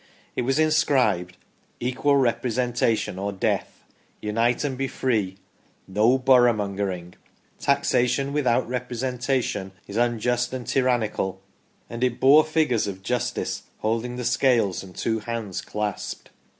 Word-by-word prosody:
It - - 0
was 135 +3 0
inscribed: 140 - +2 0.2
" - - -39
Equal 140 +3 +2
Representation 120 -4 0
or 100 +1 -2
Death," 95 - -2 0.2
" - - -38
Unite 115 +4 +1
and 140 -3 -1
be 135 +1 -2
Free," 105 -9 -1 0.2
" - - -37
No 110 +7 +3
Boroughmongering," 100 -8 +2 0.3
" - - -38
Taxation 140 -1 +2
without 130 -4 +2
Representation 125 -4 -2
is 105 +3 -3
Un 120 -1 +1
just 120 +2 0
and 125 -2 -4
Tyrannical," 110 -7 0 0.5
and 115 +1 -5
it 125 -2 0
bore 145 +4 +7
figures 155 -9 +1
of 95 -1 -6
Justice 125 +3 -2 0.2
holding 115 +3 -1
the 125 -1 -4
scales 120 -5 +2
and 95 -2 -12
two 110 -1 -1
hands 110 -3 -4
clasped. 105 -1 -4
120 Hz, 135 wpm, -24 LUFS, 105-130 Hz, 0.5 s, bore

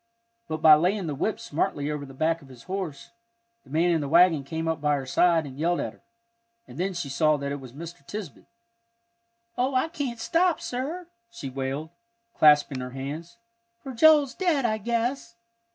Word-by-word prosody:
But 155 0 -5
by 155 - +10
laying 180 +5 +2
the 155 - -3
whip 200 +10 -2
smartly 145 -1 -2
over 145 -2 -5
the 135 - -12
back 160 +3 0
of 140 - -15
his 125 -3 -14
horse, 185 -6 -5 0.5
the - - -21
man 165 +5 +2
in 165 -2 +1
the 145 - -3
wagon 170 -2 +5
came 160 +4 -4
up 160 -2 -1
by 150 0 +2
her 135 -2 -4
side 165 +4 +3
and 135 0 -10
yelled 170 +2 +1
at - - -3
her, - - -24 0.7
and - - -11
then 190 +1 -1
she 170 -4 -3
saw 150 +2 +2
that 140 0 -4
it 145 - -4
was 130 -3 -11
Mr. 165 +1 -9
Tisbett. 205 -8 -8 1.1
"Oh, 260 +2 +1
I 260 +5 +2
can't 285 -8 -4
stop, 335 +7 +2
sir!" 290 +9 -4 0.2
she 145 -13 -7
wailed, 135 +4 -4 0.4
clasping 150 -3 +4
her 125 0 -5
hands, 155 +10 -6 0.5
"for 265 - -6
Joel's 290 +1 +5
dead, 330 -8 +1
I 220 -1 0
guess." 235 +2 -2
165 Hz, 190 wpm, -26 LUFS, 145-230 Hz, 1.1 s, by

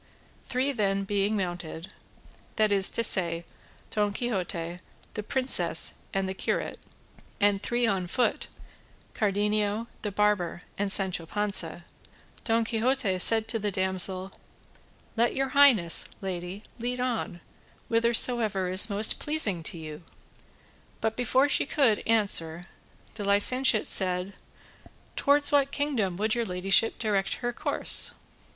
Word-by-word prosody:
Three 260 +2 -1
then 195 -5 -1
being 205 +1 -1
mounted, 175 -2 -6 0.6
that 215 -1 +1
is 195 -1 +5
to 230 - -2
say, 170 -5 +2 0.5
Don 210 -1 -1
Quixote, 180 -7 -4 0.3
the 210 - -4
princess, 260 +4 +2 0.2
and 195 -1 -2
the 190 - -4
curate, - - -4 0.6
and 205 -1 +1
three 240 +2 -1
on 190 -5 -1
foot, 245 +7 -1 0.7
Cardenio, 210 +1 -1 0.2
the 210 - -4
barber, 200 -4 -1
and 200 0 -2
Sancho 185 -4 +1
Panza, 175 -4 -1 0.6
Don 225 0 0
Quixote 225 -3 -1
said 220 +3 +5
to 225 0 -1
the 210 0 -2
damsel: 190 0 0 0.8
"Let 235 +1 0
your 270 0 -1
highness, 255 -12 +4
lady, 185 +1 -7 0.2
lead 245 +2 -4
on 240 -8 -3 0.5
whithersoever 230 -4 +2
is 190 +4 +4
most 210 +2 +3
pleasing 260 - +1
to 165 - -4
you;" 155 0 -9 1.0
but 220 0 -2
before 255 +3 +1
she 285 - +1
could 265 -10 +1
answer 180 -7 0 0.5
the 215 - -7
licentiate 215 +4 +4
said: 185 0 +3 0.8
"Towards 285 +1 +2
what 280 -1 +2
kingdom 250 -12 -2
would 215 +2 -1
your 235 -1 -2
ladyship 195 +4 +1
direct 205 -3 -2
our 240 0 -2
course? - - +1
205 Hz, 125 wpm, -26 LUFS, 185-230 Hz, 1.0 s, is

